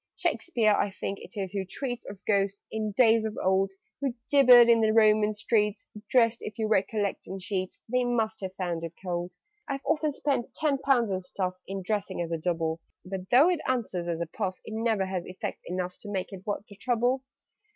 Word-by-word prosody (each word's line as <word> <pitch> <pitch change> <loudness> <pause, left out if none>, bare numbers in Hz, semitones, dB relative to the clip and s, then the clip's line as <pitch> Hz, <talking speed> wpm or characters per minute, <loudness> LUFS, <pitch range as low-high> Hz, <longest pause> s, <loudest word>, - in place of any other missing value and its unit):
"Shakspeare 230 -11 +1
I 205 - +1
think 195 0 -5
it 230 - -12
is 190 -2 -3
who 195 -1 -2
treats 245 +5 -4
Of 200 -1 -11
Ghosts, 200 -1 +1
in 215 -1 -2
days 225 -1 +5
of 220 -1 -4
old, 190 +1 +2 0.3
Who 270 -4 -1 0.2
'gibbered 250 -4 +8
in 230 -1 +5
the 220 -1 +3
Roman 215 -1 +5
streets,' 210 -1 0 0.2
Dressed, 230 -2 +4
if 210 - -7
you 220 -1 0
recollect, 205 -1 0
in 190 - -5
sheets 185 0 -3
They 250 +2 +1
must 225 -3 0
have 190 -1 -5
found 175 -3 -3
it 165 0 -5
cold. 175 0 -2 0.4
"I've 275 -1 -4
often 305 -1 +1
spent 275 -3 -2
ten 290 -3 +1
pounds 245 -6 +2
on 185 0 -1
stuff, 185 0 -3
In 195 0 -4
dressing 205 -1 -2
as 170 -1 -2
a 165 - 0
Double; 165 -1 -1 0.3
But, 190 0 -6
though 285 +9 +6
it 350 - 0
answers 210 -9 -1
as 170 -1 -2
a 170 - -1
puff, 185 +2 -4
It 220 - -7
never 220 -3 +1
has 190 -2 -3
effect 185 - -5
enough 180 0 -3
To 205 - -8
make 195 0 -3
it 195 +2 -10
worth 205 0 -2
the 200 - -15
trouble. 245 +3 +1
210 Hz, 205 wpm, -28 LUFS, 185-235 Hz, 0.4 s, gibbered